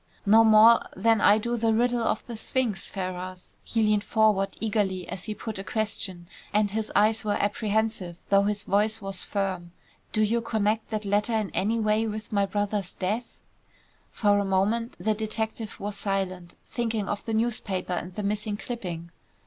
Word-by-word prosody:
"No 220 +3 +7
more 220 +1 +7 0.2
than 225 +2 +3
I 205 - +6
do 235 +2 -1
the 225 -1 +2
riddle 240 +1 +2
of 225 - -1
the 235 - -6
sphinx, 225 -2 -2
Ferrars," 185 -1 -6
he 225 -1 0
leaned 210 -1 +2
forward 215 -4 +2
eagerly 205 -4 -1
as 185 - -5
he 215 -1 -4
put 220 -3 -6
a - - -4
question, 195 -4 -2 0.2
and 205 -1 +2
his 215 +1 -2
eyes 220 +1 +3
were 205 -1 0
apprehensive, 205 -3 -1
though 195 0 +5
his 205 0 -1
voice 215 +3 +1
was 195 -2 -6
firm. 185 -4 -3 0.4
"Do 215 - +2
you 230 +2 +1
connect 220 -1 0
that 215 -1 -3
letter 205 +3 +1
in 215 -3 -1
any 220 +4 0
way 215 +1 +2
with 215 0 -5
my 200 -2 +2
brother's 205 -1 -1
death?" 215 +6 -3 0.7
For 205 -2 +2
a - - +1
moment 200 +5 0
the 220 - +1
detective 220 0 -3
was 205 0 -4
silent, 190 -3 -3
thinking 225 -4 -2
of 205 - -3
the 225 - -1
newspaper 215 -5 -1
and 180 +1 -4
the 210 - -3
missing 210 +1 -1
clipping. 175 -9 -6
210 Hz, 175 wpm, -27 LUFS, 195-220 Hz, 0.7 s, No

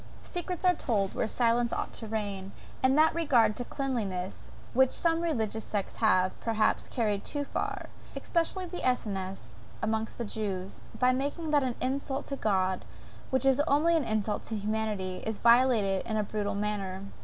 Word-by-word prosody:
Secrets 355 0 -3
are 360 - +6
told 210 - 0
where - - 0
silence 235 +1 +2
ought - - -3
to 225 - -6
reign; 200 -3 -3 0.3
and 265 +2 +4
that 315 +1 +5
regard 250 -10 +3
to 245 - -3
cleanliness, 215 -10 -3 0.2
which 265 +1 +5
some 330 +3 +2
religious 225 -10 -1
sects 205 -2 -3
have, 185 -4 +3
perhaps, 225 -2 +1
carried 210 -5 0
too 290 -1 -1
far, - - -3 0.3
especially 350 +2 0
the 355 0 -5
Essenes, 195 - -2 0.3
amongst 220 0 -2
the 235 - -3
Jews, 200 -3 -4 0.2
by 255 0 +4
making 290 +5 -2
that 295 -1 +5
an 255 -3 -1
insult 270 +1 -1
to 275 - -3
God 190 -6 +1 0.5
which 260 +1 +2
is 270 0 +4
only 320 +4 +4
an 320 - +2
insult 215 -2 -1
to 225 - -4
humanity, 210 -3 -2
is 220 -1 -2
violated 235 -5 +4
in 220 -1 -1
a 215 - +2
brutal 205 0 -2
manner. 200 -2 -2
225 Hz, 165 wpm, -29 LUFS, 205-270 Hz, 0.5 s, are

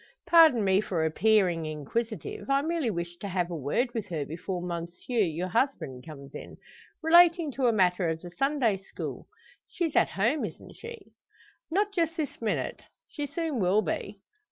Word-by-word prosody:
Pardon 325 -9 +6
me 190 0 +3
for 170 -6 -1
appearing 175 -1 +2
inquisitive. 185 - -4
I 275 +1 +3
merely 325 -5 0
wish 170 -3 -4
to 200 - -6
have 180 -2 -1
a - - -3
word 165 - -1
with 220 -4 -3
her 155 -6 -3
before 175 +4 -4
monsieur, 175 +7 -4
your 175 0 -1
husband, 205 - -1
comes 140 -3 -10
in - - -9 0.5
relating 340 -1 +6
to 260 -1 0
a - - +5
matter 180 -4 +2
of 160 0 -2
the 175 +1 -10
Sunday 270 -2 +1
school. 195 - -7 0.4
She's 335 -4 -2
at - - +4
home, 230 +10 +1
isn't - - -7
she?" 465 0 -10 0.6
"Not 405 +5 +1
just 335 -3 0
this 300 -6 -4
minute. 220 - -2 0.3
She 290 -1 -4
soon 320 -3 -2
will 195 +3 +3
be." 200 +4 -4
210 Hz, 170 wpm, -28 LUFS, 175-290 Hz, 0.6 s, Pardon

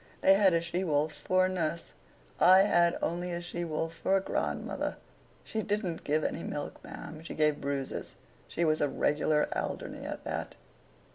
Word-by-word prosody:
They 195 - +7
had 195 -3 +5
a 165 - +2
she 175 +2 -2
wolf 150 -2 +1
for 185 0 +2
a - - +2
nurse; 170 -2 -2 0.5
I 185 +2 +8
had 175 -4 +3
only 175 +2 -1
a 170 - -2
she 175 0 -4
wolf 165 0 -2
for 195 - +3
a - - +2
grandmother. 190 - -2 0.5
She 220 - -3
didn't 200 -5 -2
give 155 +1 +1
any 165 - -2
milk, 145 -3 -5
ma'am; 155 0 -8
she 165 - -7
gave 150 -1 +2
bruises. 140 -1 -3 0.3
She 170 - 0
was 155 -1 +2
a 145 - +2
regular 150 +1 +2
Alderney - - -4
at - - -5
that. - - -4
170 Hz, 180 wpm, -30 LUFS, 155-185 Hz, 0.5 s, I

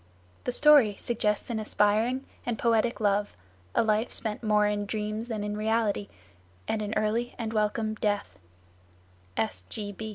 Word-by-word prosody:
The - - 0
story 280 -6 +6
suggests 215 -1 -1
aspiring 220 +3 +1 0.2
and 240 -2 -2
poetic 230 +1 +2
love, 205 -1 +1 0.4
a - - +4
life 220 +1 +1
spent 215 -2 -3
more 210 -2 +3
in 205 0 -1
dreams 215 +2 -3
than 220 -3 -3
in 210 0 -3
reality, 215 -1 0 0.6
and 220 - -1
an 210 +1 -3
early 220 +3 0
and 225 -2 -3
welcome 215 0 0
death. 205 -1 -2
215 Hz, 130 wpm, -28 LUFS, 210-230 Hz, 0.6 s, story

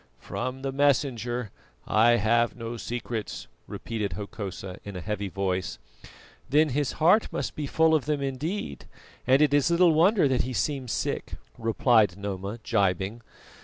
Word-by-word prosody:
"From 130 +1 -5
the 135 - -1
Messenger 125 -5 0 0.3
I 115 +2 +4
have 120 +2 +2
no 115 0 -6
secrets," 115 -1 -5 0.2
repeated 105 -5 -4
Hokosa 95 -1 -6
in 100 -1 -8
a - - -4
heavy 100 +1 -3
voice. 95 -1 -2 0.7
"Then 150 +3 +4
his 145 0 -1
heart 180 +8 +3
must - - -3
be 150 -2 -3
full 160 +3 +3
of 155 -4 +2
them 150 -1 0
indeed, 140 - -4 0.4
and 135 +3 +5
it 145 -2 +2
is 145 +2 +3
little 170 -1 +5
wonder 175 +2 +4
that 130 -1 +2
he 130 +1 -4
seems 130 +2 -1
sick," - - -2 0.2
replied 110 -4 +2
Noma, 100 +1 -4
gibing. 100 -1 0
120 Hz, 150 wpm, -27 LUFS, 105-145 Hz, 0.7 s, and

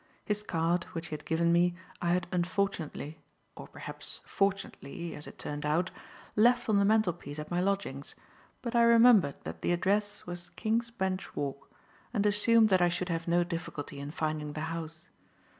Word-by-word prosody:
His 210 0 0
card, 170 -2 0
which 165 0 -4
he - - -6
had - - -10
given 170 +1 +2
me, 175 +1 +3 0.3
I 175 0 +2
had 180 - +1
unfortunately 175 -4 -2 0.4
or - - -9
perhaps - - -7
fortunately, 195 -4 -2
as 150 - -9
it - - -11
turned 145 0 -5
out 160 +5 +1 0.4
left 245 +3 +4
on 210 -3 +4
the 200 - +4
mantelpiece 175 -9 +1
at 150 +2 -6
my 175 +1 +1
lodgings; 190 -8 -2 0.5
but 235 -1 -3
I 235 - +6
remembered 235 - +6
that - - -7
the - - +1
address 205 +4 0
was 175 0 -6
King's 230 +2 0
Bench 190 -4 -3
Walk 140 -1 -4 0.5
and 205 -1 +2
assumed 215 +2 +5
that 185 -2 +4
I 175 - +5
should 180 +1 -2
have 165 0 -2
no 175 +1 +4
difficulty 165 -5 -5
in 140 +1 -5
finding 155 -1 -2
the 155 - -4
house. 165 +1 -6
175 Hz, 175 wpm, -31 LUFS, 160-205 Hz, 0.5 s, I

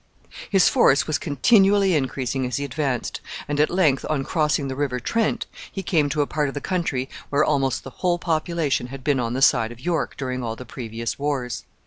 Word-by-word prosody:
His 195 -4 +5
force 140 - +4
was 155 -2 -1
continually 195 - +4
increasing 130 -2 -1
as 125 - -2
he 140 - -2
advanced, 135 -3 -2 0.3
and 145 0 -2
at 150 - +4
length, 160 -7 +2
on 150 -3 0
crossing 150 -2 0
the 130 - -4
River 135 -3 -1
Trent, 225 - 0 0.3
he 195 - -5
came 155 -6 +2
to 145 +1 +1
a - - -2
part 150 0 -1
of 135 - -5
the - - -1
country 145 -7 -1 0.2
where 145 +1 +3
almost 135 -3 0
the 135 - -9
whole 175 -1 +2
population 160 -5 -1
had 135 +1 -9
been 140 -2 +2
on 120 -1 -1
the 135 +2 0
side 115 -3 +4
of 120 - -11
York 165 +1 -1
during 130 -2 -3
all 115 -2 -3
the 125 - -9
previous 115 -1 -5
wars. 130 -5 -2
140 Hz, 205 wpm, -23 LUFS, 130-160 Hz, 0.3 s, His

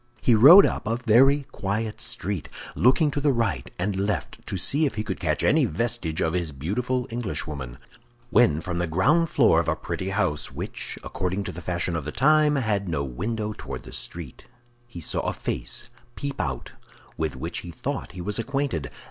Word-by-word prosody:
He 120 - +3
rode 145 - +9
up - - -2
a 115 - +1
very 130 +4 +4
quiet 105 +2 -3
street, 95 -3 -3 0.2
looking 145 +5 +3
to 145 - -2
the 145 0 +3
right 105 - -1
and 100 +3 -1
the 95 - -2
left 100 +1 -3
to 95 - -3
see 145 - +3
if 130 - -5
he 105 - -2
could - - -4
catch - - 0
any - - +4
vestige 90 -2 -2
of 80 - +1
his 85 -3 -1
beautiful 120 - -2
Englishwoman, 75 - -4 0.5
when 80 -10 +4
from 85 -1 -3
the 90 - 0
ground 145 - +3
floor 115 - +4
of 85 - -1
a - - +1
pretty 95 - -4
house, 90 -7 -1
which, - - -5
according 95 +1 -2
to - - -5
the 90 - -8
fashion 85 -1 -1
of 80 -4 -3
the 75 - -4
time, 150 - +4
had 105 -7 0
no 75 -4 -1
window 105 - -3
toward 65 -5 -7
the - - -11
street, 65 +4 -6 0.4
he 105 -8 -9
saw - - 0
a - - -1
face - - -1 0.2
peep 140 -1 -4
out 65 -4 -4 0.4
with 80 -3 -2
which 80 +6 -4
he 85 - -9
thought 85 - -5
he 90 - -7
was 105 +5 -2
acquainted. 135 - -2
100 Hz, 195 wpm, -25 LUFS, 80-120 Hz, 0.5 s, rode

